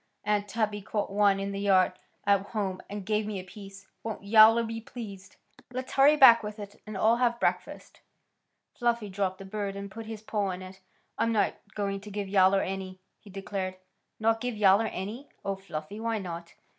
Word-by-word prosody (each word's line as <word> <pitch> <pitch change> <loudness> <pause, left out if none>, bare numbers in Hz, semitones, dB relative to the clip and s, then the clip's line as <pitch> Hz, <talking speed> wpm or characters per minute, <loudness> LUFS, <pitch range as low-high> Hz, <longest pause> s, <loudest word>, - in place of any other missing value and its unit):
Aunt 205 0 0
Tabby 215 -1 -1
caught 205 0 -3
one 200 -1 +3
in 195 0 -3
the 200 - -4
yard 190 -2 +3 0.3
at 200 -1 +4
home 200 -2 -3
and 205 -1 -6
gave 210 +1 0
me 205 -2 -3
a - - -7
piece. 195 +1 -12 0.2
Won't 225 -3 -5
Yowler 220 +2 +7
be 225 0 -5
pleased? 200 -5 -9 0.2
Come - - -20
on! 245 - -16
Let's 255 0 -4
hurry 285 +3 +6
back 240 -5 +9
with 210 0 -6
it 205 -1 -10
and 215 -2 -5
all 225 +4 +4
have 240 -1 +1
breakfast." - - -2 0.7
Fluffy 235 -3 0
dropped 190 -1 -2
the 195 - -10
bird 200 0 -4
and 200 0 -7
put 225 +2 -8
his 220 -1 -7
paw 210 -2 -1
on 185 0 -4
it. 185 +1 -11 0.4
"I'm 230 - +2
not 215 -2 +2 0.2
going 200 -1 -2
to 210 - -10
give 205 -1 -4
Yowler 195 0 +4
any," 190 -1 -5 0.2
he 210 - -16
declared. 195 -1 -4 0.4
"Not 225 0 +2
give 245 -3 -3
Yowler 205 +2 +5
any! 220 +10 -6 0.2
Oh, 195 0 -1
Fluffy! 195 0 -7
Why 225 0 -1
not?" 170 -3 -7
205 Hz, 200 wpm, -28 LUFS, 195-220 Hz, 0.7 s, back